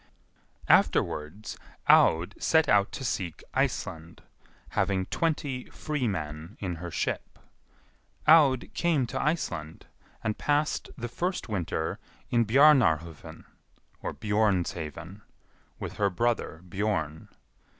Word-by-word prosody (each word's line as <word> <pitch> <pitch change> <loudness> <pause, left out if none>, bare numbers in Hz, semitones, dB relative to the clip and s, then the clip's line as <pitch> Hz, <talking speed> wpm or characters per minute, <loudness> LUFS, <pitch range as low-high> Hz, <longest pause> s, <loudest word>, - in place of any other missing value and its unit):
Afterwards 80 +8 +1 0.3
Aud 80 +2 +5
set 160 -1 +3
out 100 -1 +3
to - - -5
seek 95 -6 -3
Iceland, 80 +1 -2 0.5
having 95 -1 0
twenty 145 - -2
free 150 -5 -2
men 80 -1 -5
in 90 -4 -3
her 85 +1 -6
ship. - - -3 0.9
Aud 145 -5 +5
came 160 -7 +1
to 130 +3 -3
Iceland, 85 - -2 0.4
and 110 -1 -2
passed 150 +1 0
the 120 -2 -4
first 180 +5 -3
winter 85 -5 -2 0.3
in 120 -1 +3
Bjarnarhofn 85 - +3 0.6
(Bjornshaven) 95 -4 -1 0.6
with - - -6
her 100 -1 +2
brother 105 -5 -1
Bjorn. 85 -5 -2
100 Hz, 100 wpm, -28 LUFS, 85-130 Hz, 0.9 s, Aud